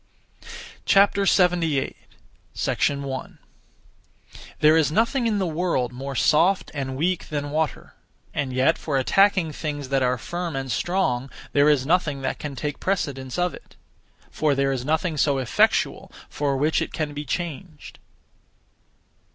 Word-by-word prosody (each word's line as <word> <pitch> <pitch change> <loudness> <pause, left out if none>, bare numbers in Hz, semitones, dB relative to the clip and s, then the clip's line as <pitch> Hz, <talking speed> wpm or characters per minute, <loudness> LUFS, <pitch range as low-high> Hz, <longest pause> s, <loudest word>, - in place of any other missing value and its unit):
78. 180 -7 +3 0.6
1. 140 -2 -2 1.2
There 155 +1 +6
is 155 -2 +3
nothing 235 - +1
in 215 -2 +1
the 195 - 0
world 160 -7 -1
more 135 +2 -6
soft 175 +9 +3
and 135 -3 -4
weak 175 +4 -1
than 145 -1 -3
water, 155 0 -2 0.4
and 140 -2 -2
yet 130 +5 +2
for 145 -4 -1
attacking 190 +4 +3
things 145 -3 -5
that 135 -1 +1
are 125 0 +1
firm 175 +5 -4
and 135 -1 -3
strong 140 -9 0 0.2
there 145 +1 +5
is 140 -4 +2
nothing 150 -4 +1
that 130 - -2
can 145 -2 -5
take 150 +1 -4
precedence 135 -9 -2
of 180 0 0
it; - - -14 0.6
for 150 -2 +1
there 135 0 +1
is 130 -2 -2
nothing 155 +3 0
(so 140 -1 +2
effectual) 130 -3 +1 0.2
for 140 -2 -1
which 150 +4 +1
it - - -3
can 150 -3 -3
be 145 +1 -5
changed. 160 +1 -6
150 Hz, 140 wpm, -24 LUFS, 135-175 Hz, 1.2 s, There